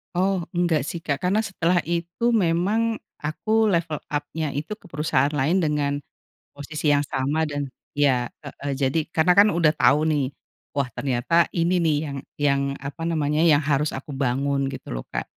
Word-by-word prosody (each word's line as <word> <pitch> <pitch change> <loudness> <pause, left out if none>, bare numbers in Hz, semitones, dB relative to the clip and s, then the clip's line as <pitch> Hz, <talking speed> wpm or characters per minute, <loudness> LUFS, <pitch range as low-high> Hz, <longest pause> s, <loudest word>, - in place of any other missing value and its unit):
Oh, 185 -1 +1
enggak 170 -5 +1
sih, 170 0 -5
Kak, 140 -3 -1
karena 200 +4 +2
setelah 180 -4 +1
itu 175 +7 -1
memang 215 +3 +1 0.2
aku 220 +9 0
level 170 -6 +1 0.2
up-nya 145 0 -2
itu 155 +9 -4
ke 220 - -23
perusahaan 150 -4 0
lain 150 +6 +2
dengan 150 -4 0 0.6
posisi 150 +1 -1
yang 145 - +4
sama 145 +2 -1
dan 145 -2 -4 0.2
iya, 130 -4 +2 0.2
heeh, 140 -1 -5
jadi, 140 +3 0
karena 165 +2 +3
kan 200 +3 +6
udah 165 -5 +3
tau 145 +1 +3
nih. 145 -4 +1 0.5
Wah, 140 - +2
ternyata 140 +7 +1
ini 175 +2 +2
nih 160 -3 +2 0.2
yang 140 - -5 0.2
yang 140 -1 +2
apa 140 +4 -7
namanya 150 -2 0
yang 160 -3 +5
harus 150 +1 +1
aku 140 +2 -8
bangun 135 +1 0
gitu 135 - -7
loh, - - -3
Kak. - - -3
155 Hz, 170 wpm, -24 LUFS, 140-170 Hz, 0.6 s, kan